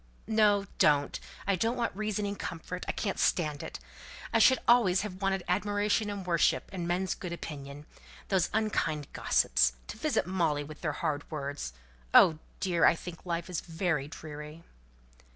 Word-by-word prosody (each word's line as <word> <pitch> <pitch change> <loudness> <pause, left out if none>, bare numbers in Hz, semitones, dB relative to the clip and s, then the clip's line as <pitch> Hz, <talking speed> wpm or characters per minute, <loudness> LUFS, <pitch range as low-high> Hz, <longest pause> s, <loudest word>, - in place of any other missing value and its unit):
No, 210 -2 +3
don't! 145 -1 +3 0.3
I 195 0 +2
don't 225 +7 0
want 235 -4 -1
reasoning 210 -1 -2
comfort. 180 0 -6
I - - +1
can't 200 -3 -3
stand 150 -4 +1
it. - - -7 0.5
I - - +4
should 260 - +7
always 225 -7 +5
have 195 -2 -6
wanted 195 -1 0
admiration 205 +3 +1
and 200 -2 -5
worship, 170 -3 +2
and 175 -3 -3
men's 180 +2 0
good 180 - -7
opinion. 145 -3 -7 0.4
Those 190 -3 +2
unkind 165 -9 -1
gossips! - - +3
To - - -8
visit - - 0
Molly 170 -5 0
with 150 +1 -11
their 155 - 0
hard 150 -3 -2
words! 140 - -4 0.4
Oh, 160 -3 +7 0.2
dear! 175 -4 +1
I 165 - +7
think 175 +1 -9
life 170 0 -2
is 180 -3 -3
very 160 -4 -1
dreary." 150 +1 -9
175 Hz, 160 wpm, -30 LUFS, 155-200 Hz, 0.5 s, should